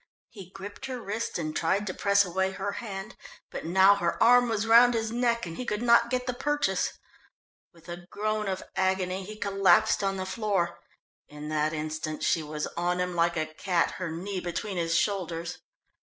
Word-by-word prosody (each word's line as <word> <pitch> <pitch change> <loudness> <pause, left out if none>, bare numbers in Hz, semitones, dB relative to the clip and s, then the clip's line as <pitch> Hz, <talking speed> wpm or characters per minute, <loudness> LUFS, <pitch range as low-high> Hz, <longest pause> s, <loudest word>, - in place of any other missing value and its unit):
He 195 -5 -11
gripped 205 +7 -8
her 255 -2 -5
wrist 225 +1 -3
and 155 -2 -4
tried 195 +5 +1
to 185 - -3
press 200 +1 +3
away 190 +2 -1
her 200 +1 -3
hand, 200 -2 -6 0.4
but - - -6
now 190 +3 +6
her 170 -4 -1
arm 245 0 +6
was 220 -1 0
round 235 +2 +6
his 225 -1 -1
neck, 235 -1 +1
and 165 -1 -7
he - - -3
could 215 -1 -2
not 235 0 +5
get 250 0 -1
the 250 - -2
purchase. 290 +3 0 0.8
With 165 -1 -20
a 175 0 -8
groan 215 0 -2
of 190 -1 -3
agony 190 0 0
he 215 +3 -8
collapsed 195 -3 +3
on 195 0 0
the 185 - -3
floor. 190 -3 -1 0.5
In 150 +1 -8
that 155 0 0
instant 155 0 -4
she 165 - +2
was 150 0 -4
on 175 +1 0
him 180 0 -1
like 170 0 +1
a 155 - 0
cat, 170 +2 0
her 175 - -2
knee 185 +4 -4
between 180 +2 -4
his 170 -1 +1
shoulders. 170 -3 -2
190 Hz, 190 wpm, -28 LUFS, 170-215 Hz, 0.8 s, now